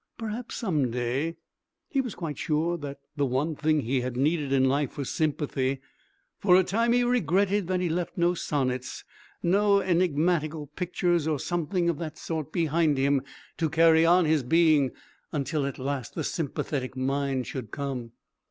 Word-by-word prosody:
Perhaps 225 +2 -5
some 155 - 0
day... 125 +7 -1 0.5
He 275 - +1
was 245 -6 -6
quite 160 -4 -5
sure 160 +2 0
that 145 -4 -6 0.2
the 145 - +1
one 140 +6 -1
thing 155 0 +1
he 130 +1 0
had 125 0 -4
needed 145 +1 +1
in 130 -1 +4
life 140 0 0
was 140 -3 -3
sympathy. 140 -4 -1 0.6
For 180 -3 +5
a 185 - +6
time 230 +6 +1
he 245 +1 +4
regretted 200 -4 +2
that 185 0 0
he 180 - +1
left 170 +1 -2
no 175 0 +3
sonnets 130 -6 -2 0.4
no 200 +3 +4
enigmatical 165 -4 +1
pictures 175 -2 0
or 155 -2 +1
something 175 +3 -1
of 170 -4 0
that 160 -2 -5
sort 155 -2 -4
behind 160 -3 +1
him 140 0 +2 0.4
to 160 -2 0
carry 160 +1 +5
on 175 +1 +5
his 155 -1 +3
being 155 0 +4 0.4
until 145 0 -1
at 140 - -5
last 135 -1 -4
the - - -2
sympathetic 135 -4 -3
mind 135 -1 -1
should 125 -6 -6
come.... 130 -3 -5
155 Hz, 165 wpm, -27 LUFS, 140-175 Hz, 0.6 s, a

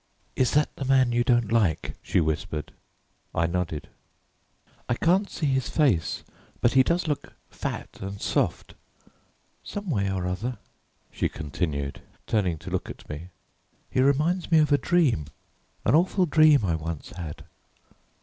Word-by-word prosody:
"Is 130 - +2
that 150 0 +2
the - - -5
man 130 -2 +4
you 120 0 +2
don't 120 -4 +2
like?" 105 -9 +1
she - - +1
whispered. 80 -1 -2 0.6
I 85 - +2
nodded. 85 -3 -2 1.0
"I 120 - +2
can't 185 +9 +2
see 155 - -3
his 135 -2 +1
face, 130 - +1 0.4
but 120 - +3
he 135 - +7
does 170 +5 +1
look 150 -2 -3 0.2
fat - - -5
and 100 +1 -5
soft. - - -1 0.9
Someway 145 - -2
or 95 -2 -2
other," 110 +8 -3 0.5
she - - -1
continued, 70 -2 -3 0.2
turning 95 -7 +1
to - - -9
look - - -2
at - - -10
me, 75 +4 -6 0.6
"he 130 - +2
reminds 150 +7 +2
me 165 - +5
of 155 -1 +4
a 145 - +6
dream, 150 - +2 0.6
an - - +3
awful 180 +4 +4
dream 155 - +5
I 85 - +1
once 80 -1 -4
had. 85 -4 -7
120 Hz, 150 wpm, -26 LUFS, -, 1.0 s, he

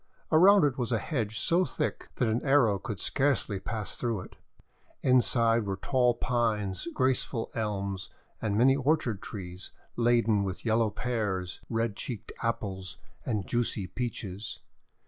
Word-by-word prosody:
Around 185 +4 +7
it 140 -3 +2
was 125 -1 -1
a 115 - +3
hedge 110 -4 -2
so 170 +8 +3
thick 155 -4 -3
that 125 - +1
an 110 +2 +1
arrow 130 -8 +4
could 100 -1 -5
scarcely 135 - +1
pass 110 0 -3
through 115 -5 -1
it. - - -12 0.7
Inside 115 -3 +4
were 100 - -1
tall 125 +3 +2
Pines, 110 - -1
graceful 130 -3 0
Elms, 100 -3 -3 0.3
and 105 -2 0
many 130 +4 +5
orchard 135 -7 +1
trees 90 -2 -7 0.2
laden 115 -3 +3
with 95 +2 -5
yellow 110 0 +3
Pears, 105 -6 -2
red 115 -2 0
cheeked 115 -1 -6
Apples, 95 -5 -3 0.3
and 105 -5 -1
juicy 120 -5 0
Peaches. 105 -1 -5
115 Hz, 140 wpm, -29 LUFS, 100-125 Hz, 0.7 s, Around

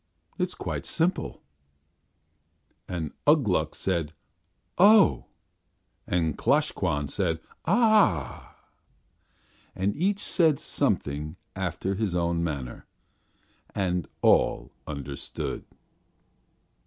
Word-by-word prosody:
It - - +2
is - - -12
quite - - -4
simple." 175 +3 -1 1.4
And 80 -4 -4
Ugh 150 -1 +6
Gluk 80 -6 0
said 85 -5 -1 0.7
"Oh!" 205 +2 +6 0.8
and 80 -4 0
Klosh - - +2
Kwan 75 0 -1
said 85 0 -1 0.3
"Ah!" 205 - +2 1.2
And 95 +2 -1
each 190 +6 +1
said 160 -5 +3
something 75 - -1 0.2
after 95 - -2
his 100 -3 -1
own 85 -1 0
manner, 70 -7 -5 0.9
and 90 -4 -1 0.2
all - - +3 0.2
understood. 70 -2 -5
90 Hz, 90 wpm, -27 LUFS, -, 1.4 s, Ugh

